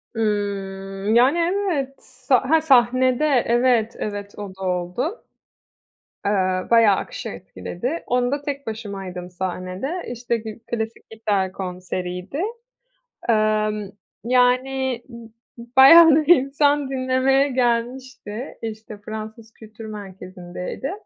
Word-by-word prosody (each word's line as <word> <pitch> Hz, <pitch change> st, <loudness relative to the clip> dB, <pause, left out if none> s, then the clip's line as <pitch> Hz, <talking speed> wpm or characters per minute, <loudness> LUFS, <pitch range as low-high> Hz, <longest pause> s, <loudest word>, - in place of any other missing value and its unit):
Imm, 200 Hz, -1 st, -2 dB
yani, 255 Hz, +7 st, +5 dB
evet, 290 Hz, -8 st, -2 dB
a 260 Hz, 0 st, +3 dB
ha 320 Hz, +1 st, +5 dB
sahnede 255 Hz, -1 st, +3 dB
evet, 240 Hz, -4 st, +2 dB
evet 205 Hz, -1 st, -5 dB
o 200 Hz, -2 st, -7 dB
da 190 Hz, -, -15 dB
oldu. 180 Hz, -, -3 dB, 1.0 s
Iıı, 185 Hz, -2 st, 0 dB
bayağı 230 Hz, -4 st, +6 dB
akışı -, -, -5 dB
etkiledi. 175 Hz, -, -5 dB
Onda 250 Hz, +3 st, 0 dB
tek 280 Hz, -2 st, -5 dB
başımaydım 195 Hz, -5 st, -6 dB
sahnede. 185 Hz, -, -4 dB
İşte, 240 Hz, 0 st, -2 dB
gi 220 Hz, 0 st, -8 dB
klasik 225 Hz, -1 st, -4 dB
gitar 205 Hz, -4 st, -1 dB
konseriydi. 180 Hz, -, -5 dB, 0.9 s
Emm, 215 Hz, -2 st, +1 dB, 0.3 s
yani, 250 Hz, +1 st, +1 dB
b 235 Hz, -2 st, -12 dB, 0.5 s
bayağı 325 Hz, +5 st, +10 dB
bir 310 Hz, +3 st, +6 dB
insan 285 Hz, +1 st, +1 dB
dinlemeye 265 Hz, +1 st, +2 dB
gelmişti. 245 Hz, -1 st, -2 dB
İşte, 220 Hz, -1 st, -7 dB
Fransız 220 Hz, +1 st, -8 dB
Kültür 220 Hz, 0 st, -12 dB
Merkezi'ndeydi. 185 Hz, +2 st, -7 dB
230 Hz, 105 wpm, -22 LUFS, 200-260 Hz, 1.0 s, bayağı